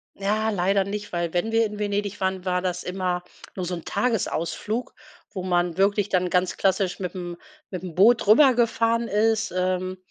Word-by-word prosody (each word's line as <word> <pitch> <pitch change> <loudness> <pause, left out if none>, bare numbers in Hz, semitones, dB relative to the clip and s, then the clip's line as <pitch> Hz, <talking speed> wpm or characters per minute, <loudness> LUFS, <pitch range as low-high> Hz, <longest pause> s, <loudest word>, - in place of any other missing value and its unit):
Ja, 215 +3 0
leider 195 -1 +2
nicht, 205 +1 -6
weil 170 -1 -2
wenn 180 +6 0
wir 225 0 +3
in 210 -1 -6
Venedig 205 -1 -2
waren, 190 -1 -1
war 180 -1 0
das 180 -1 -2
immer 180 -1 -2 0.3
nur 185 - -3
so 180 +1 -3
'n 170 - -9
Tagesausflug, 225 0 -2 0.4
wo 190 -3 -5
man 175 -2 0
wirklich 200 +1 +2
dann 180 -1 +1
ganz 180 +1 +1
klassisch 190 -1 +1
mitm 180 -1 -5 0.3
mitm 180 -2 -6
Boot 220 +4 +5
rübergefahren 230 -1 +4
ist, 220 0 +1
ähm, 185 0 -1
190 Hz, 165 wpm, -24 LUFS, 180-215 Hz, 0.4 s, Boot